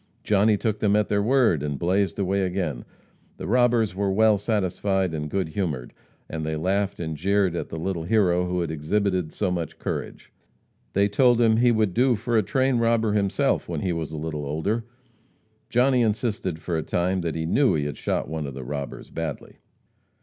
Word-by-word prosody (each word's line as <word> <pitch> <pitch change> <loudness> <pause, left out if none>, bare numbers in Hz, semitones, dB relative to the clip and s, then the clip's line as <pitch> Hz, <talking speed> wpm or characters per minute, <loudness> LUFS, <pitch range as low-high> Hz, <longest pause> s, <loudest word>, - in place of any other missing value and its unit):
Johnny 105 +1 +3
took 105 0 -1
them 105 -1 +2
at 105 0 +1
their 100 0 +2
word, 115 - +3
and 75 -1 -3
blazed 95 +4 0
away 100 0 0
again. 90 -9 -2 0.5
The - - -6
robbers 120 -3 +2
were 100 +1 0
well 110 +1 +4
satisfied 95 -3 0
and 75 -1 -3
good 95 -2 -1
humored, 75 -9 -3 0.3
and 80 0 -5
they 80 0 -2
laughed 100 +5 -1
and 80 -2 -3
jeered 95 +2 +1
at - - -4
the 80 - -6
little 85 +1 -2
hero 90 -3 +2
who 90 0 -1
had 85 - -2
exhibited 90 +2 -1
so 95 -3 -1
much 85 -3 -3
courage. - - -5 0.6
They 100 +1 +3
told 120 +3 +3
him 110 -2 +4
he 120 +1 +4
would 110 -5 +1
do 125 +2 +3
for 115 +2 -2
a 110 - +5
train 130 +5 +1
robber 115 -2 +2
himself 100 -2 +1
when - - -3
he 90 -2 0
was 80 -2 -4
a 80 - -5
little 75 -1 -4
older. 80 +11 -2 0.8
Johnny 125 +1 +3
insisted 110 -5 -1
for 85 +1 -4
a 80 - 0
time 90 +4 0
that 85 -2 -3
he 80 0 -2
knew 130 - +3
he 75 -2 -1
had 75 - -3
shot - - -1
one 80 -1 -4
of 70 - -7
the 65 - -6
robbers 70 +2 -6
badly. 80 -3 -6
95 Hz, 195 wpm, -25 LUFS, 80-110 Hz, 0.8 s, a